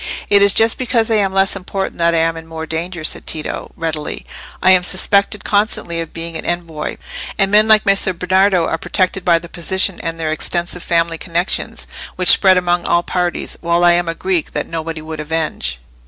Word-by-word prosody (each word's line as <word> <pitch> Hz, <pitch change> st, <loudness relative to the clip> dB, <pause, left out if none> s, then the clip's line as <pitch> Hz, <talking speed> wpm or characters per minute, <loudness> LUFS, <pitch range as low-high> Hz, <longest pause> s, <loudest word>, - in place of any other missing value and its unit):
"It 200 Hz, 0 st, +6 dB
is 200 Hz, 0 st, +6 dB
just 225 Hz, +3 st, +3 dB
because 230 Hz, -3 st, 0 dB
I 220 Hz, -, +3 dB
am 195 Hz, -2 st, +1 dB
less 195 Hz, +1 st, +1 dB
important 195 Hz, -1 st, -5 dB
that 170 Hz, 0 st, +2 dB
I -, -, +2 dB
am 165 Hz, 0 st, +1 dB
in 160 Hz, 0 st, -9 dB
more 160 Hz, 0 st, -6 dB
danger," 165 Hz, +1 st, -5 dB
said -, -, -3 dB
Tito, 155 Hz, -1 st, -4 dB
readily. 160 Hz, -2 st, -4 dB, 0.3 s
"I 185 Hz, -, +4 dB
am 185 Hz, -1 st, +5 dB
suspected 200 Hz, +3 st, +2 dB
constantly 205 Hz, -5 st, 0 dB
of 165 Hz, -, -7 dB
being 165 Hz, 0 st, -6 dB
an -, -, -4 dB
envoy. 165 Hz, -3 st, -4 dB, 0.4 s
And 195 Hz, -1 st, +2 dB
men 210 Hz, +1 st, +5 dB
like 215 Hz, -1 st, +5 dB
Messer 195 Hz, -1 st, +2 dB
Bernardo 185 Hz, 0 st, +2 dB
are 165 Hz, -, -2 dB
protected 185 Hz, +2 st, -1 dB
by 170 Hz, -1 st, +4 dB
their 170 Hz, +1 st, -7 dB
position 190 Hz, +2 st, 0 dB
and 165 Hz, 0 st, -4 dB
their 160 Hz, -1 st, -2 dB
extensive 175 Hz, +2 st, -2 dB
family 165 Hz, -1 st, 0 dB
connections, 175 Hz, +1 st, -1 dB, 0.3 s
which 185 Hz, -1 st, +4 dB
spread 190 Hz, -2 st, +6 dB
among 175 Hz, -1 st, 0 dB
all 170 Hz, 0 st, +1 dB
parties, 180 Hz, -1 st, -2 dB
while 170 Hz, +1 st, +1 dB
I 175 Hz, -, +6 dB
am 175 Hz, 0 st, +1 dB
a 165 Hz, -, -3 dB
Greek 185 Hz, -3 st, -2 dB
that -, -, -2 dB
nobody 165 Hz, -1 st, -5 dB
would 155 Hz, 0 st, -7 dB
avenge." 150 Hz, -, -2 dB
175 Hz, 200 wpm, -17 LUFS, 165-190 Hz, 0.4 s, It